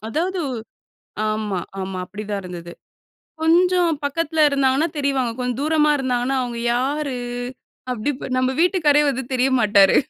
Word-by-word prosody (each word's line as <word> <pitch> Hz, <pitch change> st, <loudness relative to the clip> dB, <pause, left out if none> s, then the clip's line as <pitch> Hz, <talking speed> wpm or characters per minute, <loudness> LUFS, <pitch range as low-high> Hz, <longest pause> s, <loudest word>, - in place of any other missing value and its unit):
அதாவது 350 Hz, +8 st, -1 dB, 0.9 s
ஆமா, 215 Hz, -3 st, -1 dB, 0.2 s
ஆமா. 190 Hz, 0 st, -4 dB
அப்டி 210 Hz, +3 st, -7 dB
தான் 200 Hz, -1 st, -1 dB
இருந்தது. 175 Hz, -1 st, -8 dB, 0.7 s
கொஞ்சம் 345 Hz, 0 st, +3 dB
பக்கத்தில 320 Hz, +2 st, -1 dB
இருந்தாங்கன்னா 275 Hz, +2 st, +2 dB
தெரிவாங்க. 275 Hz, -4 st, 0 dB
கொஞ்சம் 250 Hz, 0 st, -2 dB
தூரமா 300 Hz, 0 st, +3 dB
இருந்தாங்கன்னா, 255 Hz, 0 st, 0 dB
அவுங்க 240 Hz, -2 st, -4 dB
யாரு? 270 Hz, +1 st, -1 dB, 0.7 s
அப்டி 245 Hz, +3 st, -2 dB
இப்ப 260 Hz, -, -7 dB
நம்ம 255 Hz, 0 st, +2 dB
வீட்டுக்காரரே 310 Hz, -5 st, +4 dB
வந்து 265 Hz, -1 st, -2 dB
தெரிய 255 Hz, +1 st, +2 dB
மாட்டாரு. 200 Hz, -3 st, +5 dB
265 Hz, 130 wpm, -21 LUFS, 235-305 Hz, 0.9 s, மாட்டாரு